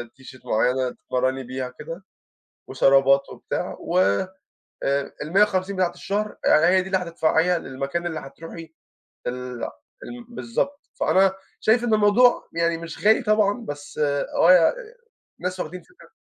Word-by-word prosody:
تيشيرت 130 -1 -14
معيّنة 125 +3 +1
تتمرّني 130 +2 -2
بيها 130 +1 -5
كده 165 +5 -8 0.6
وشرابات 135 0 +4
وبتاع، - - -5
و - - -1 0.9
آآ 140 0 -1
ال150 190 +3 +1
بتاعة 180 -2 0
الشهر 210 +4 -3
يعني 155 - +5
هي 185 +2 +4
دي 185 - -7
اللي 190 - +1
هتدفعيها 170 0 +1
للمكان 140 +5 -4
اللي 160 -2 -4
هتروحي 160 +3 -10 0.5
ال 125 -1 -5 0.4
ال 245 0 -9
بالضبط، 260 +4 -4
فأنا 190 0 +3 0.3
شايف 225 +2 +3
إن 230 -2 +1
الموضوع 215 +4 +4
يعني 170 0 +1
مش 165 +3 -9
غالي 220 +3 +5
طبعًا، 215 +1 +1
بس 145 -3 -8
آه 145 +3 +2
يع 170 -3 +5 0.7
ناس 185 +1 -4
واخدين 180 +3 -5
فكرة 365 - -20
170 Hz, 135 wpm, -23 LUFS, 140-200 Hz, 0.9 s, يعني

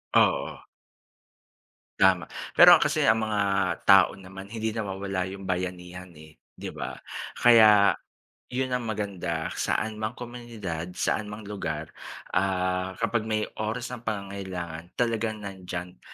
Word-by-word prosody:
Oo. - - +3 1.4
Tama, 95 -2 +3 0.2
pero - - +9
kasi - - +1
ang 110 -1 +3
mga 105 -1 0 0.4
tao 95 -1 +6
naman 95 0 -10
hindi 110 +1 -3
nawawala 95 -3 -3
'yong 95 +1 -8
bayanihan, 90 -1 -4
eh, 80 0 -15 0.2
'di - - -6
ba? - - -6 0.4
Kaya, 110 -4 +7 0.6
'yon 130 +1 -2
ang 125 -2 -1
maganda, 95 -6 -3
saan 110 0 -1
mang 110 +2 -3
komunidad, 110 -9 -6
saan 110 - -1
mang 105 +1 -8
lugar, 80 -7 -5 0.4
ah, 95 0 0
kapag 115 -1 0
may 110 -1 0 0.2
oras 115 +3 -3
ng 125 -2 -7
pangangailangan 95 -5 -5
talagang 115 -3 -1
nandiyan 90 -4 -7
100 Hz, 125 wpm, -27 LUFS, 90-110 Hz, 1.4 s, pero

